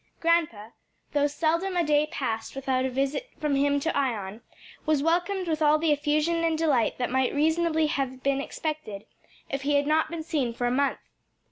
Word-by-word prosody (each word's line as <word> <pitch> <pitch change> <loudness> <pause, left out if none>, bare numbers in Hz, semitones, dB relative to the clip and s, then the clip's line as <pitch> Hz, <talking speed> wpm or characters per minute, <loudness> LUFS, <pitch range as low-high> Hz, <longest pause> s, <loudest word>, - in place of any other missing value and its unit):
Grandpa, 320 -11 +1 0.4
though 290 0 +2
seldom 335 +5 0
a 345 - +3
day 300 -1 +2
passed 225 -5 -3
without 260 -1 0
a - - 0
visit 275 - -2
from 300 -2 0
him 285 +1 +2
to 325 +4 -2
Ion, 225 -6 -2 0.4
was 305 -2 +1
welcomed 355 +3 0
with 315 -1 -1
all 300 0 +5
the 315 0 +1
effusion 300 +3 +1
and 325 -1 +1
delight 295 -8 +1
that 245 -1 -2
might 260 +1 +1
reasonably 320 +1 +2
have 265 -3 -2
been 275 0 +1
expected 290 -10 -5 0.5
if 275 - -2
he 290 +1 +1
had 285 0 +3
not 310 +1 +2
been 330 -1 -5
seen 270 -8 -1
for 245 - -2
a 245 - +1
month. 275 +2 +1
295 Hz, 190 wpm, -26 LUFS, 265-320 Hz, 0.5 s, all